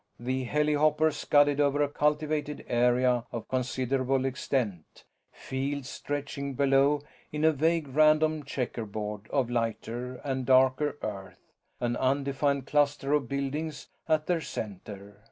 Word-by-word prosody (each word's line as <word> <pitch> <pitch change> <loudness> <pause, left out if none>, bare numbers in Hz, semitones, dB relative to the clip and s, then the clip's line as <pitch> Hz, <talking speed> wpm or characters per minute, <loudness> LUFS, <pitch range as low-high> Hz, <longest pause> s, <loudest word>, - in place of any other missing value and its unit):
The 130 +2 -2
helihopper 150 +2 +2
scudded 145 -1 +3
over 145 0 +3
a - - +1
cultivated 150 0 -1
area 125 0 +2
of 115 - -5
considerable 130 +1 0
extent, 125 - -3 0.3
fields 135 0 -4
stretching 140 0 -4
below 140 +2 +3 0.3
in 150 +1 -1
a 160 - +6
vague 160 +1 +1
random 155 +2 +3
checkerboard 110 -5 -4
of 130 -4 0
lighter 120 +1 -2
and 130 -2 -2
darker 130 +3 +3
earth, 100 -2 -7 0.3
an 120 -1 -1
undefined 140 +1 0
cluster 145 -1 +1
of 140 -5 +1
buildings 140 +3 -3 0.2
at 155 -1 +2
their 175 -2 0
center. 100 - -7
135 Hz, 120 wpm, -28 LUFS, 125-150 Hz, 0.3 s, a